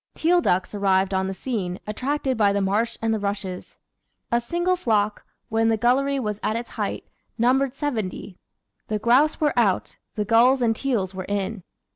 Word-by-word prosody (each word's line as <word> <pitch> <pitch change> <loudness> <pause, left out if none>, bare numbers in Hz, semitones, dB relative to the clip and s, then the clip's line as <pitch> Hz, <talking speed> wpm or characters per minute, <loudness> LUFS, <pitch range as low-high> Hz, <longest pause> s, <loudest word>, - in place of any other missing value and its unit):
Teal 350 +2 +3
ducks 185 - 0
arrived 195 -1 +2
on 190 0 0
the 190 - -3
scene, 190 -7 -3
attracted 265 +5 -1
by 210 -3 +3
the 200 - 0
marsh 205 +4 0
and 225 0 +2
the 220 - -1
rushes. 200 -2 -4 0.5
A 235 0 +2
single 345 +8 0
flock, 215 - 0 0.2
when 225 0 +1
the 225 -1 +2
gullery 270 +4 +2
was 210 -4 -3
at 215 - -1
its 235 +1 -5
height, - - -3 0.3
numbered 255 +3 +2
seventy. 215 -9 -4 0.5
The 215 - -1
grouse 250 +8 +3
were 295 -2 +2
out, 210 -6 +1 0.2
the 210 - -1
gulls 245 +4 +4
and 225 -1 +2
teals 220 -8 -1
were 185 -1 -5
in. 205 0 -3
225 Hz, 175 wpm, -24 LUFS, 200-255 Hz, 0.5 s, gulls